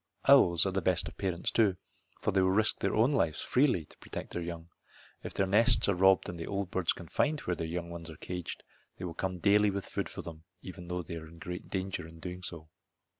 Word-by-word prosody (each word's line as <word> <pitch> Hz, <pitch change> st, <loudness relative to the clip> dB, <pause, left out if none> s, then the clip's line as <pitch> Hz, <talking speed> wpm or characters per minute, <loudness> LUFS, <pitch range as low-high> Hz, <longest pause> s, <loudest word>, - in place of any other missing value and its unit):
Owls 85 Hz, 0 st, +7 dB
are 95 Hz, -, +1 dB
the 95 Hz, 0 st, 0 dB
best 90 Hz, -2 st, +1 dB
of 80 Hz, -, -9 dB
parents, 90 Hz, -3 st, -1 dB
too, 100 Hz, -5 st, +3 dB, 0.4 s
for -, -, +1 dB
they 95 Hz, -1 st, +3 dB
will 95 Hz, -, +3 dB
risk 105 Hz, +3 st, +2 dB
their -, -, 0 dB
own 115 Hz, +6 st, +4 dB
lives 85 Hz, -, +1 dB
freely 125 Hz, -, +2 dB
to -, -, -18 dB
protect -, -, -7 dB
their 90 Hz, -, -2 dB
young. 85 Hz, -1 st, -6 dB, 0.5 s
If -, -, -7 dB
their 95 Hz, -, +2 dB
nests 115 Hz, +5 st, +4 dB
are 100 Hz, -, +3 dB
robbed 95 Hz, +1 st, +4 dB
and 85 Hz, -1 st, -6 dB
the 80 Hz, -, -5 dB
old 100 Hz, -2 st, -3 dB
birds 95 Hz, -3 st, +2 dB
can 85 Hz, -, -6 dB
find 150 Hz, -, +1 dB
where 90 Hz, -, -1 dB
their 80 Hz, 0 st, -3 dB
young 85 Hz, +1 st, -4 dB
ones 85 Hz, -1 st, -7 dB
are 80 Hz, -, -10 dB
caged 90 Hz, -2 st, -6 dB, 0.3 s
they 90 Hz, -, -5 dB
will 85 Hz, -, -4 dB
come 95 Hz, +2 st, -3 dB
daily 105 Hz, +3 st, +4 dB
with 100 Hz, -1 st, -3 dB
food -, -, -3 dB
for -, -, -7 dB
them 80 Hz, -2 st, -9 dB, 0.2 s
though 90 Hz, -1 st, -5 dB
they 85 Hz, 0 st, -6 dB
are 80 Hz, -1 st, -8 dB
in 85 Hz, +1 st, -14 dB
great 90 Hz, +2 st, -7 dB
danger 95 Hz, -3 st, -3 dB
in 80 Hz, 0 st, -13 dB
doing 90 Hz, +2 st, -6 dB
so. 85 Hz, -3 st, -7 dB
90 Hz, 240 wpm, -31 LUFS, 85-95 Hz, 0.5 s, Owls